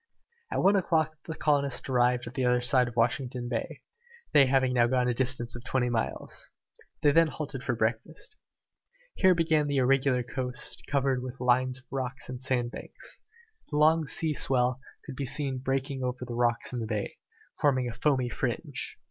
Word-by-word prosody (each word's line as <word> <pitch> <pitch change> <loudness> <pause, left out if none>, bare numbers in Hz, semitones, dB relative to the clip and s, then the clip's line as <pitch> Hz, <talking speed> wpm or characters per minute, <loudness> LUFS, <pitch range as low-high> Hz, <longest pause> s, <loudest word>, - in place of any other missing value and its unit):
At - - -1
one 195 +2 +5
o'clock 160 -4 +1
the 160 - -4
colonists 140 -5 +1
arrived 125 -1 +2
at 120 - -8
the 130 - -1
other 125 0 +3
side 125 +1 +3
of 120 - -8
Washington 120 +1 0
Bay, 115 -2 -4 0.5
they 140 -2 +7
having 130 -1 +2
now 120 -1 +4
gone 125 0 +1
a 125 - +2
distance 125 -1 -1
of 120 - -8
twenty 125 -1 0
miles. 115 -2 -3 0.5
They 145 - +6
then 165 +2 +5
halted 145 -4 -6
for 125 - -1
breakfast. 115 - -3 0.8
Here 185 -1 +4
began 160 -3 +2
the 145 -1 0
irregular 130 -1 +3
coast, 125 0 -4
covered 135 -2 +1
with 130 +1 -7
lines 125 +1 +2
of 130 - -17
rocks 130 -2 -4
and 125 -1 -6
sandbanks. 125 -2 -4 0.5
The 150 - -2
long 155 +1 +4
sea 160 +1 0
swell 125 -2 +1 0.3
could 140 - -7
be 140 - -3
seen 135 -1 -1
breaking 135 +1 -2
over 125 0 -3
the 120 - -6
rocks 120 0 0
in 125 - -2
the 115 - -3
bay, 105 -2 -3 0.4
forming 130 -4 +2
a 120 - -4
foamy 130 0 +1
fringe. 105 - -4
130 Hz, 180 wpm, -28 LUFS, 125-140 Hz, 0.8 s, they